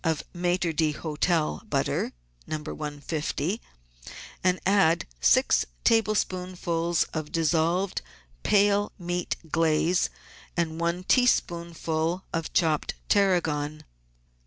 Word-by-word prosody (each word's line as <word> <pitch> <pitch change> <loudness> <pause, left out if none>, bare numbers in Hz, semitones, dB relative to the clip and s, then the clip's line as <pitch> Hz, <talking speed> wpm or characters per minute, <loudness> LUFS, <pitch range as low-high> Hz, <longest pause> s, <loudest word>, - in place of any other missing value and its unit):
of 160 -3 0
Maitre 175 -1 0
d'Hotel 155 - 0
butter - - 0 0.4
(No. 155 - -2 0.2
150) 150 +5 -3 0.8
and 185 0 +2
add 190 -4 +4
six - - +4 0.2
tablespoonfuls 180 -6 +1
of 155 -2 -4
dissolved, 170 +3 +1 0.4
pale 205 0 +3
meat 175 -1 -2 0.2
glaze 165 +2 +2 0.5
and 165 -1 -1
one 170 +2 -1
teaspoonful 170 -7 +1
of 165 -1 -2
chopped 160 -4 +1
tarragon. 155 -7 +1
170 Hz, 85 wpm, -27 LUFS, 160-185 Hz, 0.8 s, add